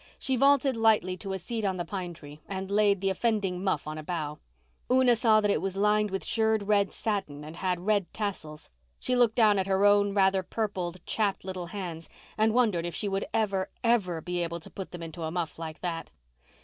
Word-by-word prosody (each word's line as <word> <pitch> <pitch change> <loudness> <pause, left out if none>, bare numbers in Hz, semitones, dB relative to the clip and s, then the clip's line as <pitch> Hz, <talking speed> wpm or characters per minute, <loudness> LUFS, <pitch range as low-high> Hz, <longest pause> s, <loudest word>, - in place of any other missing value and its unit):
She 265 - 0
vaulted 275 0 +4
lightly 220 -5 +3
to 195 +1 -6
a - - -1
seat 220 +5 -4
on 190 -2 0
the 175 - -3
pine 180 -1 -5
tree, 150 -1 -12
and 190 0 -5
laid 200 -2 +3
the 195 0 +1
offending 195 -3 -1
muff 190 -7 0
on 155 0 -5
a - - -7
bough. 150 -3 -4 0.5
Una 255 -1 +5
saw 220 -2 +4
that 205 -1 +2
it - - +1
was 195 0 -3
lined 210 +1 +3
with 195 0 -3
shirred 220 -2 +1
red 200 -1 +2
satin 190 -10 -3
and 155 +2 -9
had 180 -1 -2
red 200 -5 +1
tassels. 160 - -5 0.3
She 255 - 0
looked 240 -3 +3
down 215 -4 +5
at 190 - -1
her 195 +1 +2
own 205 0 +4
rather 190 -1 +4
purple, 185 -3 -3
chapped, 205 -4 -1
little 185 -2 -5
hands 170 -4 -6 0.3
and 220 +1 +3
wondered 215 -8 +2
if 170 - -6
she 210 - -2
would 195 0 -1
ever, 195 -4 0
ever 200 -9 +1
be 180 +2 -3
able 170 0 -3
to - - -10
put 195 - -7
them 175 -1 -8
into 165 +1 -8
a 160 - -2
muff 165 -2 -3
like 160 -1 -7
that. 165 -3 -4
195 Hz, 215 wpm, -28 LUFS, 175-215 Hz, 0.5 s, Una